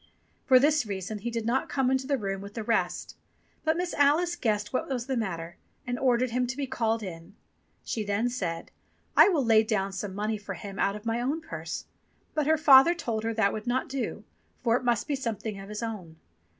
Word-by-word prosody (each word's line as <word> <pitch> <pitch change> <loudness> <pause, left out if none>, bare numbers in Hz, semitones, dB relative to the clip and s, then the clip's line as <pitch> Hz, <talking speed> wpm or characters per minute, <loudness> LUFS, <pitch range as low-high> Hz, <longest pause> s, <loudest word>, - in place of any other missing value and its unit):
For 260 - +8
this 295 -1 +3
reason 200 +1 -4
he 235 +4 -3
did 230 -1 -3
not 245 +3 0
come 265 -2 +1
into 265 0 0
the 280 -1 +1
room 195 -4 -3
with 200 +1 -10
the 225 - -3
rest. 230 +1 -1 0.5
But 315 +1 +2
Miss 360 0 -2
Alice 310 +5 +3
guessed 210 -8 -1
what 255 - -1
was 250 -3 -2
the 265 0 -2
matter, 170 -7 -3 0.3
and 245 -1 -3
ordered 250 -1 +2
him 250 +1 0
to 255 +2 -4
be 285 - -1
called 225 -3 -1
in. 165 0 -8 0.5
She 220 - -2
then 205 +3 0
said, 180 -9 -3 0.4
"I - - +8
will 305 -9 +1
lay 225 -1 +6
down 205 -3 -1
some 195 0 -5
money 210 +1 -1
for 200 -2 -6
him 195 +3 -8
out 200 - +2
of 210 +1 -9
my 230 +1 0
own 280 +6 -1
purse"; 165 - -6 0.5
but 305 -2 0
her 315 0 +4
father 295 +3 +7
told 230 -10 -3
her 225 0 -1
that 210 -3 +2
would 215 +2 -6
not 255 +2 0
do, 265 -1 -3 0.4
for 235 -1 +3
it 250 - -1
must 240 0 +1
be 290 - 0
something 220 -5 -4
of 195 +1 -9
his 210 +2 -5
own. 195 -8 -6
230 Hz, 220 wpm, -28 LUFS, 205-265 Hz, 0.5 s, For